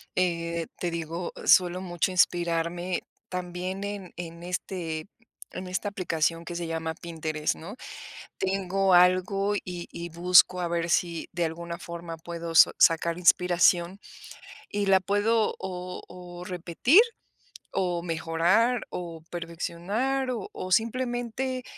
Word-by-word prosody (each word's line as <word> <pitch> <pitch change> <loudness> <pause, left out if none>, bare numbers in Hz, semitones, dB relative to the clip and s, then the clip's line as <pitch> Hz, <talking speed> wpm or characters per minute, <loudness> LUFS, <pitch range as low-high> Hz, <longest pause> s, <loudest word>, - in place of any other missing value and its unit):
Eh, 170 -2 0
te 175 - -1
digo, 170 +1 -4
suelo 180 0 +5
mucho 175 0 -1
inspirarme 175 0 +1 0.3
también 180 +1 -4
en 200 -3 -5
en 170 -1 -7
este 175 -3 -4 0.4
en 185 - -6
esta 185 +3 -2
aplicación 165 -3 -1
que 175 - -6
se 170 -1 -3
llama 160 0 -2
Pinterest, 160 -2 -3
¿no? 185 +7 -9 0.6
Tengo 190 0 +1
algo, 185 +3 +4
y 180 -3 -5
y 170 0 -6
busco 180 +2 +5
a 175 - 0
ver 170 0 -1
si 170 0 0
de 175 0 0
alguna 170 +1 -5
forma 170 -1 -7
puedo 170 0 -6
sa-sacar 165 +1 +5
inspiración, 180 +1 +3 0.7
y 205 -1 -1
la 190 -1 +6
puedo, 210 +3 +1
o 180 -1 -5
o 175 -1 -10
repetir, 180 - +4 0.7
o 175 -2 -1
mejorar, 175 +8 +2
o 170 -2 -6
perfeccionar 180 +10 -2
o 225 -6 -4
o 185 - -6
simplemente, 245 +3 0
175 Hz, 125 wpm, -27 LUFS, 170-190 Hz, 0.7 s, la